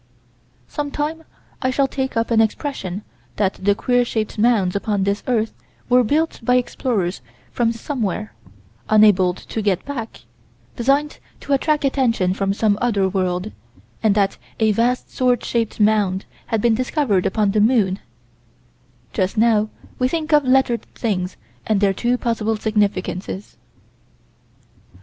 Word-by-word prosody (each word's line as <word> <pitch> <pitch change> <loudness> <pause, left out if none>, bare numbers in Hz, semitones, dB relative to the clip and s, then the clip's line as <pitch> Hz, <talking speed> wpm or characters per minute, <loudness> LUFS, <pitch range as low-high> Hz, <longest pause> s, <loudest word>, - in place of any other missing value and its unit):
Some 290 - -3
time 310 +3 -3 0.4
I 255 - +1
shall 270 +1 +2
take 265 -2 -3
up 230 +1 0
an 225 -1 +5
expression 215 - -2 0.3
that 195 -2 +1
the 200 +1 +3
queer 245 +3 +2
shaped 220 -2 -3
mounds 210 -5 +3
upon 200 -1 0
this 200 +1 0
earth 225 -3 0 0.4
were 250 0 +5
built 310 +7 0
by 250 +2 +2
explorers 220 - -1 0.3
from 235 -1 +1
Somewhere, 220 - -3 0.6
unable 205 -4 +5
to 220 - -5
get 200 -4 0
back, 250 -6 -6 0.5
designed 275 +5 +1 0.2
to 285 - -1
attract 295 +1 +1
attention 235 -9 +1
from 195 0 -1
some 205 0 +1
other 205 -5 +2
world, 185 +1 -1 0.5
and 215 -3 +3
that 200 -2 +1 0.2
a 220 -1 +4
vast 240 +4 0
sword 250 -2 +1
shaped 230 -2 -1
mound 205 -3 +2 0.2
has 225 -2 0
been 235 +2 +3
discovered 245 - +1
upon 210 0 +1
the 210 +1 +2
moon 210 -5 +3 1.1
Just 190 +4 -1
now 215 -1 +3 0.3
we 255 - +3
think 315 +2 -2
of 295 -1 +6
lettered 255 -2 +3
things 185 -5 -2 0.3
and 215 -2 +2
their 195 -1 +3
two 240 +5 0
possible 225 -2 -1
significances. 200 -3 -2
220 Hz, 140 wpm, -21 LUFS, 200-250 Hz, 1.1 s, of